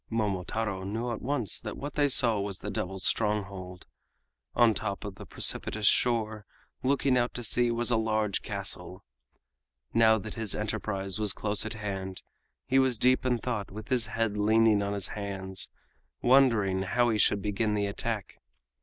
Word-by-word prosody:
Momotaro 105 -1 -2
knew 115 +5 -3
at 115 - -5
once 130 -5 -1
that 105 -2 -7
what 145 +1 -6
they 145 -1 +2
saw 115 -5 +3
was 100 -2 -3
the - - -6
devils' 95 0 -2
stronghold. 100 -4 0 0.7
On 120 -1 +6
the - - +1
top 100 -2 -4
of 100 - -5
the - - -11
precipitous 110 -1 0
shore, 110 -2 +2 0.3
looking 130 -1 +2
out 120 0 -1
to 120 - -4
sea, 120 +2 +3
was 120 +1 -1
a 120 - +3
large 110 -2 0
castle. - - -3 0.9
Now 110 -1 +5
that 110 0 -7
his 110 -3 -1
enterprise 105 -2 -3
was 105 -3 +2
close 105 +1 -1
at 110 - -5
hand, 95 -3 -5 0.4
he 135 - +3
was 130 -3 +2
deep 130 +2 +3
in 125 -1 +2
thought 115 -4 -3
with 105 +2 -9
his 120 -4 +1
head 110 -1 -1
leaning 110 0 +4
on 100 0 -2
his 100 -4 0
hands, 95 -2 -4 0.5
wondering 115 -8 +4
how 120 +6 +1
he 110 - 0
should 100 -1 +3
begin 105 +1 0
the 100 -1 0
attack. 105 +1 -3
110 Hz, 170 wpm, -29 LUFS, 100-120 Hz, 0.9 s, On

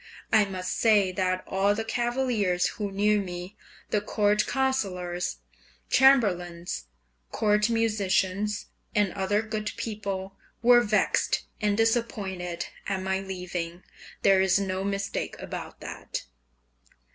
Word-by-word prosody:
I 215 -2 +6
must 185 -2 -4
say 205 -4 +4
that 185 0 0
all 200 +2 +2
the 225 - -2
cavaliers 235 -6 +1
who 205 -3 -4
knew 210 +2 +3
me, 180 +1 -7 0.4
the 210 - +2
court 210 0 +2
councillors, 190 -10 -1 0.5
chamberlains, 180 - +3 0.5
court 210 +1 +2
musicians, 210 -2 +1 0.3
and 205 -3 +2
other 205 +2 0
good 215 -1 -3
people, 195 -3 -4 0.3
were 240 0 +7
vexed 210 -2 +1 0.2
and 205 -1 +1
disappointed 195 -7 -1 0.2
at 195 -1 -1
my 190 0 0
leaving. 180 -2 -5 0.4
There 195 -1 +6
is 190 0 +4
no 190 -1 -1
mistake 200 0 -2
about - - -7
that. - - -6
200 Hz, 115 wpm, -27 LUFS, 185-215 Hz, 0.5 s, were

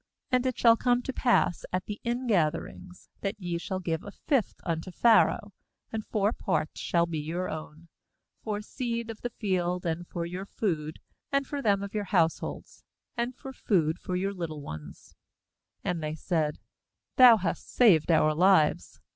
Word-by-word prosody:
^And 255 0 +3
it 255 - -2
shall 230 -1 +6
come 245 +1 +1
to 265 - -4
pass 240 -10 +2
at 185 +1 -1
the 210 0 -6
ingatherings, 200 -6 -1
that 200 +1 -3
ye 175 -3 -3
shall 190 +1 -3
give 165 -3 -2
a - - -8
fifth 255 +3 -1
unto 165 +1 -3
Pharaoh, 220 0 +3 0.4
and 220 -1 -3
four 210 +1 +1
parts 160 -6 -2
shall 170 -1 +2
be 165 -2 -3
your 170 +5 -3
own, 155 +1 -8 0.6
for 210 -1 -2
seed 235 -1 -3
of 220 - -12
the 245 - -2
field, 180 -5 -1
and 170 +1 -2
for 170 -1 -4
your 180 +3 -6
food, 160 -9 -2 0.3
and 275 0 +1
for 285 +1 -4
them 200 -4 +2
of 200 - -7
your 210 -1 -2
households, 170 -4 -1 0.3
and 240 +1 -2
for 270 0 -9
food 170 -9 +1
for 180 - -4
your 195 +2 -1
little 160 -5 -5
ones/ 75 - -9 0.7
^And 170 -2 -1
they 155 0 -3
said: 160 -2 -1 0.6
"Thou 245 -3 +9
hast^ 180 -4 -3
saved 185 -12 +4
our 155 -2 +4
lives. 160 - +3
185 Hz, 170 wpm, -28 LUFS, 165-225 Hz, 0.7 s, Thou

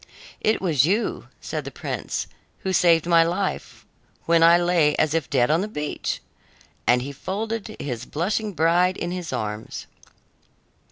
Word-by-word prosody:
"It 215 -2 +1
was 155 -8 +3
you," 200 +9 0
said - - -4
the - - -6
prince, - - -4 0.4
"who 190 - -2
saved 170 -3 +4
my 170 -1 +5
life 175 +4 -2 0.4
when 165 0 +4
I 170 +1 +7
lay 175 -4 +3
as 155 - +1
if 165 -4 -1
dead 130 0 +2
on 165 +3 +3
the 205 - -2
beach," 150 -8 -3 0.7
and 125 +1 +4
he 140 - -5
folded 215 +8 -4
his 120 -4 -4
blushing 205 +6 -2
bride 175 +3 +3
in 175 - -3
his 180 -2 -4
arms. 105 0 -4
170 Hz, 155 wpm, -24 LUFS, 150-185 Hz, 0.7 s, I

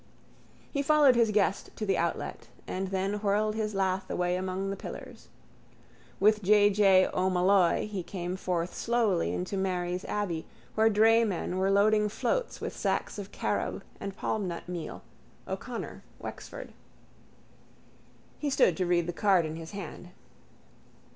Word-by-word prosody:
He 280 - 0
followed 290 -3 +5
his 230 -2 +4
guest 205 -1 +1
to 215 - -3
the 195 - +2
outlet - - -2 0.2
and 190 +1 -2
then 195 +2 -1
whirled 210 +1 +1
his 215 -1 -2
lath 190 -1 0
away 180 0 0
among 190 +1 -2
the - - -2
pillars. - - -9 0.9
With 210 +2 +4
J. 205 +1 +5
J. 195 -2 +5
O'Molloy 185 -1 +3
he 205 -3 -4
came 175 0 -4
forth 180 -2 -2
slowly 225 -7 +1
into 185 +2 -3
Mary's 180 -1 -1
abbey 180 -6 -2 0.3
where 220 +1 +4
draymen 215 -4 +3
were 190 +1 +2
loading 210 +1 +4
floats - - -1
with - - -5
sacks - - -1
of 200 0 -7
carob - - -2 0.2
and 195 -1 -6
palmnut 185 -6 -3
meal, 175 -2 -6 0.4
O'Connor, - - -5
Wexford. - - -8 1.7
He 295 - -1
stood 185 -10 +4
to 185 - 0
read 175 -1 +2
the 175 - -3
card 190 -2 +3
in 155 0 -4
his 165 0 -8
hand. 180 -3 -8
195 Hz, 140 wpm, -29 LUFS, 180-210 Hz, 1.7 s, followed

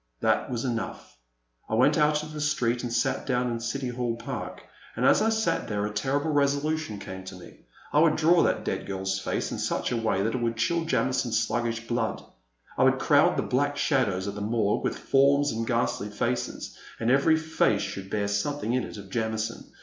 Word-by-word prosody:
That - - +1
was 120 0 -3
enough. 115 -3 -4 0.5
I 110 - 0
went 135 +6 +4
out 150 -1 +2
into 155 0 -9
the 150 - -5
street 125 -5 +1
and 120 - -4
sat 115 +2 0
down 125 -2 +1
in 115 - -2
City 125 +3 -3
Hall 120 -1 -2
Park. 115 - -6 0.3
And, - - 0
as - - +5
I 220 - +3
sat 220 0 0
there, 105 -1 -1
a 105 - -4
terrible 140 +8 0
resolution 145 -3 0
came 95 -1 -8
to 95 - -8
me; 90 - -15 0.3
I 150 - +5
would 155 -1 +5
draw 165 +2 +4
that - - +1
dead - - -3
girrs 95 0 -2
face 95 - -2
in - - -4
such - - -1
a 120 - 0
way 110 -4 0
that 110 +2 0
it 125 - -2
would 115 -1 -1
chill 170 +6 +1
Jamison^s 130 -6 0
sluggish 115 +1 -1
blood, 120 -2 -1 0.6
I - - +5
would - - +4
crowd - - +4
the - - +1
black 145 +3 0
shadows 110 - +1
of 100 - -3
the 105 - -6
Morgue 105 -1 0
with - - -1
forms 140 +1 +3
and 115 +1 -3
ghastly 115 -4 0
faces, 115 +4 -3 0.2
and 115 - +1
every 140 +4 +4
face 160 -10 +1
should 95 0 -6
bear 100 -1 -1
something 115 +5 -1
in 130 -1 +1
it - - -8
of 100 -2 -11
Jamison. 110 0 -2
120 Hz, 210 wpm, -27 LUFS, 110-145 Hz, 0.6 s, as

